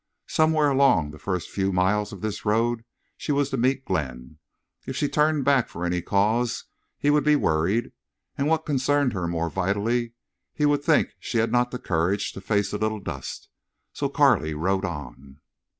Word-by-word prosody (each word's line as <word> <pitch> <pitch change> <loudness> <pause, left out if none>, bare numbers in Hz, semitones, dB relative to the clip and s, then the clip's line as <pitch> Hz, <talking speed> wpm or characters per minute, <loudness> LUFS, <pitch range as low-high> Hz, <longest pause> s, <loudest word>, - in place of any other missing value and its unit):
Somewhere 155 -1 +2
along 130 - +3
the 75 - -12
first 90 +1 -3
few 95 -1 0
miles 95 +3 +1
of 100 - -9
this 110 -1 -4
road 115 +2 +1 0.3
she - - -3
was 140 -1 +1
to - - 0
meet 130 +2 +1
Glenn. 70 -4 -4 0.5
If 130 - -4
she 145 - +1
turned 150 -1 +1
back 135 -4 +3
for 85 - -5
any 90 0 0
cause 110 +7 +1 0.3
he 145 - +2
would 150 0 +3
be 150 0 +4
worried, 95 - +1 0.4
and, 140 - -1
what 160 0 +1
concerned 145 -1 +1
her 90 -4 -2
more 85 -1 -2
vitally, 105 +5 0 0.4
he 150 - +1
would 145 -1 +2
think 155 0 +2
she 120 - -3
had 115 0 +1
not 125 0 +2
the 125 - -5
courage 95 0 0
to 95 - -9
face 100 0 0
a 105 - -2
little 110 0 -1
dust. 70 -8 -7 0.5
So - - -2
Carley 75 0 +3
rode 95 +5 0
on. 70 -4 -8
105 Hz, 180 wpm, -25 LUFS, 90-135 Hz, 0.5 s, be